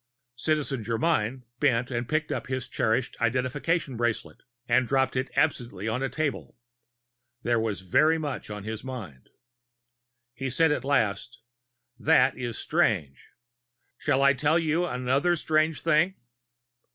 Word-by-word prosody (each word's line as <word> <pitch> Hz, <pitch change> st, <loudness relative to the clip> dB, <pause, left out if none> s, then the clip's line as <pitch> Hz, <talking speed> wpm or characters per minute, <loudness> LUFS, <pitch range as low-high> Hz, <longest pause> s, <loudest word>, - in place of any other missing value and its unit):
Citizen 140 Hz, -2 st, -1 dB
Germyn 115 Hz, +1 st, 0 dB, 0.2 s
bent 125 Hz, -4 st, +2 dB
to 120 Hz, -2 st, -1 dB
pick 155 Hz, +5 st, -1 dB
up -, -, -3 dB
his 130 Hz, 0 st, -3 dB
cherished 120 Hz, 0 st, 0 dB
identification 130 Hz, +4 st, 0 dB
bracelet 120 Hz, -1 st, -2 dB, 0.3 s
and 130 Hz, -1 st, +3 dB
dropped 135 Hz, 0 st, +1 dB
it 130 Hz, +1 st, -1 dB
absently 120 Hz, -9 st, 0 dB
on 115 Hz, +4 st, -1 dB
a 135 Hz, -, -1 dB
table. 145 Hz, +1 st, -3 dB, 0.9 s
There 120 Hz, -1 st, +2 dB
was 110 Hz, -4 st, -2 dB
very 155 Hz, -, +3 dB
much 145 Hz, -7 st, -4 dB
on 105 Hz, -1 st, -6 dB
his 110 Hz, +1 st, -5 dB
mind. 110 Hz, -, -8 dB, 1.0 s
He 135 Hz, +2 st, -4 dB
said 160 Hz, +5 st, +3 dB
at 150 Hz, -, -1 dB
last: 115 Hz, -3 st, 0 dB, 0.6 s
"That 135 Hz, -4 st, +4 dB
is 120 Hz, -3 st, -4 dB
strange. 70 Hz, -2 st, 0 dB, 0.7 s
Shall 135 Hz, +1 st, +1 dB
I 140 Hz, 0 st, +6 dB
tell 145 Hz, +4 st, +2 dB
you 165 Hz, +1 st, +1 dB
another 130 Hz, +6 st, +1 dB
strange 155 Hz, -1 st, +1 dB
thing?" 165 Hz, +4 st, +2 dB
130 Hz, 135 wpm, -27 LUFS, 115-150 Hz, 1.0 s, I